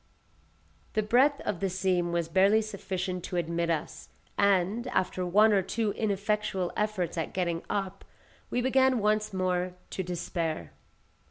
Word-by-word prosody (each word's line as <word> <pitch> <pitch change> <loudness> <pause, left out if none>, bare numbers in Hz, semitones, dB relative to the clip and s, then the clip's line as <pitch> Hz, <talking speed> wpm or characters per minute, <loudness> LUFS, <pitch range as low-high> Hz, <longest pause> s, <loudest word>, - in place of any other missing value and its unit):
The 215 - +1
breadth 260 +7 +3
of 195 -5 -3
the 195 - 0
seam 180 -2 0
was 170 -1 0
barely 195 +6 +4
sufficient 185 -3 -4
to - - -5
admit 170 0 -1
us, 160 -3 -3 0.3
and, 200 +4 +2
after 185 -5 0
one 210 +4 +5
or 195 - +4
two 215 +3 -1
ineffectual 200 -3 -1
efforts 185 -6 -1
at 160 - -3
getting 170 -2 0
up, 195 -1 -3 0.5
we 245 - 0
began 260 0 +3
once 215 0 +1
more 185 -1 -1 0.2
to - - -2
despair. 170 - -3
190 Hz, 145 wpm, -29 LUFS, 175-210 Hz, 0.5 s, one